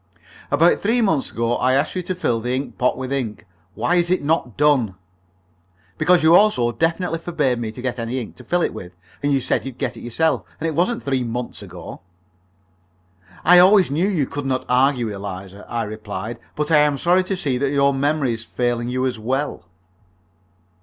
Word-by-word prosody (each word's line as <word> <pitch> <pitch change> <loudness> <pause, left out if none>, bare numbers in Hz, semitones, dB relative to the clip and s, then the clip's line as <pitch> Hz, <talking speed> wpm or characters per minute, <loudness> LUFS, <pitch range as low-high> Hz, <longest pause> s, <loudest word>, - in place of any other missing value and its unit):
"About 165 +4 +3
three 230 +4 +2
months 165 - +1
ago 115 +1 -1
I 130 +1 +2
asked 140 - 0
you 185 - -1
to 185 +1 -4
fill 120 -10 0
that 125 +2 -2
ink 130 -1 -3
pot 125 - +2
with 130 +1 -4
ink. 120 -6 -3 0.3
Why 175 - +1
is 170 0 +1
it 185 -3 +1
not 145 -6 -1
done?" 135 -9 +2 1.0
"Because 180 -2 +4
you 160 +2 +7
also 180 - +4
definitely 165 +4 -1
forbade 150 -8 -1
me 110 -2 -3
to 125 +3 -10
get 125 -1 -2
any 115 +3 -2
ink 115 - -8
to - - -12
fill 175 -1 0
it - - -1
with. 90 0 -9 0.3
And 145 - 0
you 135 - +3
said 130 - -1
you'd 135 -2 -7
get - - -3
it - - -10
yourself. 160 +7 0 0.2
And 165 - -1
it 160 - -2
wasn't 185 +9 0
three 135 -2 0
months 120 0 -5
ago." 90 -3 -10 1.4
"I 180 +2 +8
always 185 -3 +6
knew 165 +7 +1
you 175 -9 +1
could 145 +1 -5
not 130 -1 -1
argue, 125 -1 +2
Eliza," 100 0 -8
I 120 -1 -1
replied. 110 +1 -6 0.2
"But 150 +1 -2
I 155 - +6
am 150 -1 +3
sorry 180 +4 +3
to 190 0 -2
see 135 -8 -1
that 140 0 +1
your 140 0 +3
memory 140 -2 0
is 115 0 -6
failing 120 0 -2
you 130 +1 -1
as 125 -4 -2
well." 130 -5 -3
135 Hz, 200 wpm, -21 LUFS, 120-165 Hz, 1.4 s, I